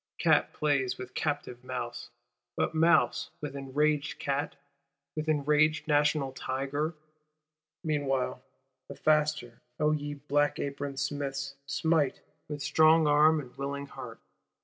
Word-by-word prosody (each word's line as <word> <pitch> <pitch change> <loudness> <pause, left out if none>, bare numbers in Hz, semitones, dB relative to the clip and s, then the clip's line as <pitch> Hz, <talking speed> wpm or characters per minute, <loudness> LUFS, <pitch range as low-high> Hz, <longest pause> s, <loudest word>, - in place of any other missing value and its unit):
Cat - - +3
plays 135 -4 0
with 125 0 -8
captive 145 -5 -3
mouse: 125 -2 -5 0.5
but - - 0
mouse 160 -6 +3
with 145 -2 -5
enraged 140 +2 0
cat, 140 +1 -2 0.6
with 155 0 -3
enraged 150 +1 +2
National 150 -2 +2
Tiger? 140 +5 -2 0.9
Meanwhile, 135 -5 -1 0.5
the - - -8
faster, 150 -6 +1 0.2
O 150 0 +3
ye 145 -1 -2
black 145 +1 +1
aproned 140 0 -4
Smiths, 140 -1 -3
smite; 155 -2 +1 0.3
with 145 -1 -5
strong 160 +1 +5
arm 150 +2 +5
and 125 -4 -9
willing 140 +1 -3
heart. 140 - -9
145 Hz, 120 wpm, -29 LUFS, 135-150 Hz, 0.9 s, strong